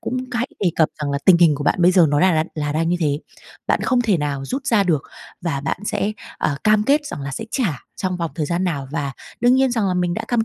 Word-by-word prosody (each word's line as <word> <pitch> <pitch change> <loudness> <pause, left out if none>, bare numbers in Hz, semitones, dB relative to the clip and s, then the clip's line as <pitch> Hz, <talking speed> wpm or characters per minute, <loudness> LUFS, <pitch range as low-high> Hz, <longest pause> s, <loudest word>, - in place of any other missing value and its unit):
cũng 255 - -3 0.2
hãy 245 +2 -1
đề 185 - +2
cập 160 - +4
rằng 145 - -1
là 140 - 0
tình 180 -3 +7
hình 165 -3 +5
của 145 0 -4
bạn 175 - +2
bây 180 +2 +6
giờ 180 -3 +6
nó 145 - +2
là 185 0 +4
là 155 - +2
là 150 -1 -2
đang 165 +2 0
như 175 - +1
thế. 145 -3 +1 0.5
Bạn - - +1
không 255 -2 +2
thể 210 -7 +2
nào 145 -2 -2
rút 270 +1 -4
ra 225 -6 +4
được 155 -6 +1 0.4
và 150 -5 -1
bạn 145 - -2
sẽ, 210 +2 -1 0.3
ờ, 145 - 0
cam 215 0 +4
kết 290 +3 +2
rằng 150 - -6
là 140 - -4
sẽ 220 - -5
trả 210 - -1 0.2
trong 185 -1 -2
vòng 170 -2 -3
thời 155 -3 -1
gian 175 +3 -1
nào 145 -7 -2
và 140 -3 -2 0.3
đương 245 +1 +5
nhiên 265 -1 +3
rằng 220 -5 +1
là 185 - 0
mình 175 -1 0
đã - - -4
cam 235 -2 +1
175 Hz, 280 wpm, -21 LUFS, 150-215 Hz, 0.5 s, tình